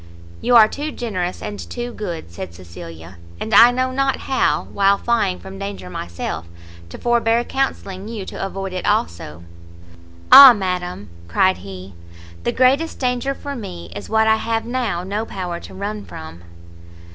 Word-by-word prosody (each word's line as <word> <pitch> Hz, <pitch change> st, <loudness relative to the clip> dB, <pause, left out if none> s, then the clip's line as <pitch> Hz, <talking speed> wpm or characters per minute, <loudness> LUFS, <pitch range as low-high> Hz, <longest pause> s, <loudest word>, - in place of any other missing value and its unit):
"You 245 Hz, -, +3 dB
are 220 Hz, -2 st, +9 dB
too 295 Hz, +6 st, -5 dB
generous, 185 Hz, -9 st, -4 dB
and 105 Hz, -1 st, -5 dB
too 240 Hz, -, -6 dB
good!" 170 Hz, -, -6 dB
said 85 Hz, 0 st, -8 dB
Cecilia, 85 Hz, -1 st, -11 dB, 0.2 s
"and 220 Hz, -, -4 dB
I 230 Hz, +4 st, +9 dB
know 255 Hz, +1 st, 0 dB
not 270 Hz, 0 st, 0 dB
how, 265 Hz, -, +1 dB
while 200 Hz, 0 st, +3 dB
flying 210 Hz, -6 st, 0 dB
from 190 Hz, 0 st, -10 dB
danger 200 Hz, -, -6 dB
myself, 85 Hz, -2 st, -5 dB, 0.4 s
to -, -, -9 dB
forbear 235 Hz, -1 st, +2 dB
counselling 205 Hz, -8 st, -3 dB
you 220 Hz, -4 st, -6 dB
to -, -, -6 dB
avoid 195 Hz, -1 st, -4 dB
it 185 Hz, -, -3 dB
also." 85 Hz, -1 st, -1 dB, 0.9 s
"Ah 275 Hz, -2 st, +12 dB
madam!" 180 Hz, -, -4 dB, 0.2 s
cried 185 Hz, -, +2 dB
he, 95 Hz, -1 st, -10 dB, 0.5 s
"the -, -, +2 dB
greatest 275 Hz, +6 st, +2 dB
danger 250 Hz, +1 st, -1 dB
for 285 Hz, 0 st, -6 dB
me 85 Hz, -, -8 dB
is 105 Hz, -, -7 dB
what 220 Hz, 0 st, +3 dB
I 220 Hz, 0 st, +4 dB
have 225 Hz, 0 st, -2 dB
now 235 Hz, -8 st, -2 dB
no 205 Hz, +4 st, -2 dB
power 180 Hz, -5 st, -5 dB
to -, -, -12 dB
run 205 Hz, +2 st, -4 dB
from!" 80 Hz, +2 st, -10 dB
200 Hz, 160 wpm, -20 LUFS, -, 0.9 s, Ah